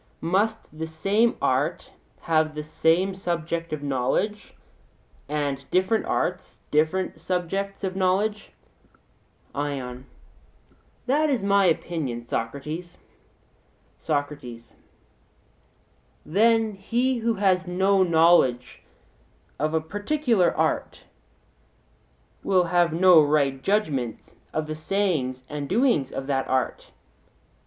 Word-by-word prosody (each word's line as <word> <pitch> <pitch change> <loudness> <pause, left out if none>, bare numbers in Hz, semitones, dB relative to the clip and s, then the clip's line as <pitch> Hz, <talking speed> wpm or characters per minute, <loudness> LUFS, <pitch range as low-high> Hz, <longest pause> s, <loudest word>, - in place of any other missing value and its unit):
Must 200 +1 -1
the 160 +1 -4
same 200 +9 +1
art - - 0 0.3
have 155 -1 +1
the 150 - -4
same 165 +5 +1
subject 170 -3 -3
of 155 -2 -4
knowledge, 140 - -1 0.7
and 145 -2 -2
different 185 +5 +1
arts 180 +1 -2
other 160 +5 +1
subjects 195 +3 -3
of 190 -1 -2
knowledge? 195 +3 0 1.0
ION: 135 -3 -4 1.0
That 300 +4 +2
is 255 -8 0
my 200 0 +3
opinion, 155 -8 -1
Socrates. 150 +10 -5 1.0
SOCRATES: 145 -6 -4 1.5
Then 225 +4 +3
he 240 +6 -1
who 230 0 0
has 190 -2 +1
no 190 +2 +2
knowledge 160 -8 +3 0.8
of 155 +2 0
a 160 - +2
particular 205 - +1
art - - -1 1.4
will 185 -2 +3
have 175 -1 +2
no 175 0 +6
right 145 -3 +1
judgment 145 - -1 0.2
of 155 - -2
the 155 - -4
sayings 155 -7 -1
and 145 -1 -5
doings 225 - +2
of 135 - -5
that 135 -1 -1
art? 130 0 -1
170 Hz, 100 wpm, -25 LUFS, 145-195 Hz, 1.5 s, no